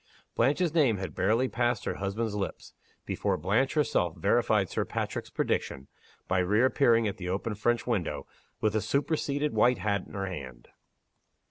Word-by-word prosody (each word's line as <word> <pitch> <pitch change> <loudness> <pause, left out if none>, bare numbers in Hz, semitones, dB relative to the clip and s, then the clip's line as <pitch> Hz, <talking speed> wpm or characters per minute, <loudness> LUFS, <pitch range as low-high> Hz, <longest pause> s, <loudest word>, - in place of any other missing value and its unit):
Blanche's 150 +7 +2
name 140 -10 +3
had 95 0 -5
barely 115 +7 +2
passed 120 -2 0
her - - -2
husband's 100 +3 -2
lips 100 -2 -5 0.3
before - - -1
Blanche 115 - +1
herself 90 - +1
verified 105 +2 +2
Sir - - -1
Patrick's - - -4
prediction, 65 +1 -2 0.4
by 95 - +1
reappearing 115 +4 +3
at 100 - -3
the 90 -2 -5
open 100 +4 -2
French 115 +3 0
window, 105 -9 -2 0.4
with 110 -1 +2
the 110 - +1
superseded 145 +4 0
white 125 0 +4
hat 100 0 -1
in - - -14
her 100 -1 -2
hand. 65 -10 -8
110 Hz, 155 wpm, -29 LUFS, 95-125 Hz, 0.4 s, white